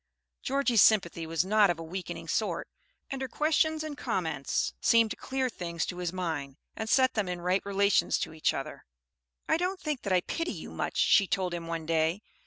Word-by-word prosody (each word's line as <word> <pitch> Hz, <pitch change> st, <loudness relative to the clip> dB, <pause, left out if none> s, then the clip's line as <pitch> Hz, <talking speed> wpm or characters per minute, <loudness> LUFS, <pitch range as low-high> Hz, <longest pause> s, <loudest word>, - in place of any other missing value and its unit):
Georgie's 260 Hz, -5 st, +2 dB
sympathy 170 Hz, -6 st, +3 dB
was 165 Hz, +2 st, 0 dB
not 210 Hz, 0 st, +4 dB
of 175 Hz, -, 0 dB
a 165 Hz, -, -7 dB
weakening 170 Hz, -1 st, -6 dB
sort, 175 Hz, -1 st, -1 dB, 0.4 s
and 270 Hz, -1 st, -4 dB
her 265 Hz, -, -2 dB
questions 310 Hz, +3 st, +1 dB
and 310 Hz, -2 st, -5 dB
comments 160 Hz, -, -1 dB
seemed 230 Hz, -2 st, +4 dB
to -, -, -3 dB
clear 265 Hz, -1 st, -2 dB
things 170 Hz, -7 st, -3 dB
to 180 Hz, -, -6 dB
his 175 Hz, -2 st, -2 dB
mind, 160 Hz, -7 st, -4 dB, 0.2 s
and 220 Hz, 0 st, -4 dB
set 260 Hz, +1 st, +4 dB
them 205 Hz, -4 st, -1 dB
in 180 Hz, -1 st, -3 dB
right 180 Hz, +2 st, +1 dB
relations 200 Hz, 0 st, +2 dB
to -, -, -4 dB
each 155 Hz, -, +1 dB
other. -, -, -6 dB, 0.6 s
"I -, -, +3 dB
don't 365 Hz, +2 st, -1 dB
think 300 Hz, -7 st, -3 dB
that 200 Hz, -, -4 dB
I 180 Hz, -1 st, +4 dB
pity 330 Hz, -, -3 dB
you -, -, -8 dB
much," -, -, -3 dB
she 200 Hz, -, +5 dB
told 185 Hz, -4 st, -1 dB
him 170 Hz, -1 st, -5 dB
one 165 Hz, -1 st, -4 dB
day. 165 Hz, +5 st, +1 dB
190 Hz, 200 wpm, -29 LUFS, 170-250 Hz, 0.6 s, she